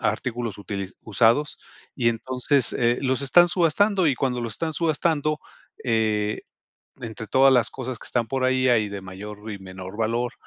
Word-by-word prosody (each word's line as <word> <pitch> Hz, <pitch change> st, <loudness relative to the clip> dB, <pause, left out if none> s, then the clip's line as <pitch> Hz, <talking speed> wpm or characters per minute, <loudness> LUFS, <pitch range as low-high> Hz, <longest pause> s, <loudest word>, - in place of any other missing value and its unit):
artículos 115 Hz, 0 st, -2 dB
utili 100 Hz, -2 st, -5 dB
usados, 115 Hz, +7 st, +2 dB, 0.4 s
y 120 Hz, -3 st, +2 dB
entonces, 130 Hz, +3 st, 0 dB
eh, 120 Hz, 0 st, +2 dB
los 130 Hz, 0 st, 0 dB
están 175 Hz, +6 st, +5 dB
subastando, 185 Hz, +2 st, +2 dB
y 140 Hz, -, +3 dB
cuando 125 Hz, -1 st, -1 dB
los 115 Hz, -2 st, -4 dB
están 160 Hz, -1 st, -3 dB
subastando, 155 Hz, -1 st, 0 dB, 0.5 s
eh, 110 Hz, -3 st, 0 dB, 0.6 s
entre 110 Hz, -1 st, -7 dB
todas 135 Hz, +5 st, +5 dB
las 120 Hz, -3 st, +3 dB
cosas 130 Hz, -2 st, -6 dB
que -, -, -11 dB
están 120 Hz, -2 st, 0 dB
por 130 Hz, +3 st, -1 dB
ahí, 130 Hz, 0 st, +2 dB
hay 110 Hz, -4 st, +3 dB
de 100 Hz, -1 st, -6 dB
mayor 105 Hz, +3 st, -9 dB
y 100 Hz, -, -6 dB
menor 95 Hz, +1 st, -9 dB
valor. 120 Hz, +2 st, 0 dB
120 Hz, 165 wpm, -24 LUFS, 110-135 Hz, 0.6 s, están